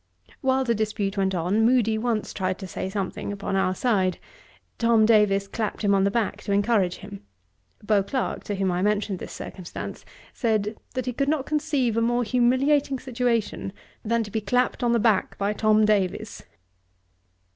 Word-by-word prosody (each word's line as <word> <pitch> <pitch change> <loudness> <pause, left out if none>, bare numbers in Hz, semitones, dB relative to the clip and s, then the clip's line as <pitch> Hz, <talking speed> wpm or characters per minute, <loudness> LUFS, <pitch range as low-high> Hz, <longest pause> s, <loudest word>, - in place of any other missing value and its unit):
While 265 -1 +2
the 235 -2 +1
dispute 210 -2 -2
went 190 -1 0
on, 180 +6 +1
Moody 230 -2 +3
once 220 -1 -1
tried 185 -1 -2
to 195 - -7
say 185 +1 -4
something 195 0 -3
upon 200 -1 -3
our 185 -1 +1
side. 190 -5 +1 0.6
Tom 230 -2 +4
Davies 210 -3 +3
clapped 215 +2 -3
him 200 -1 +3
on 195 0 +3
the - - +3
back, 220 0 -1
to - - -4
encourage 200 -3 +2
him. 200 0 -10 0.6
Beauclerk, 210 +5 0
to 205 - -2
whom 190 -1 0
I 175 0 -1
mentioned 205 -1 0
this - - -7
circumstance, 180 -3 -7 0.3
said, 215 -2 0 0.2
'that 255 - -2
he 250 - -2
could 275 +3 0
not 300 -3 0
conceive 290 -7 0
a - - +3
more 240 +1 +1
humiliating 260 +4 +2
situation 240 -6 -1 0.3
than 230 +1 +1
to 210 - -9
be 220 +1 -1
clapped 250 +6 0
on 240 - +3
the 235 - +3
back 215 -3 +1
by 200 +1 0
Tom 215 0 +3
Davies.' 200 -4 -1
215 Hz, 175 wpm, -25 LUFS, 200-240 Hz, 0.6 s, Tom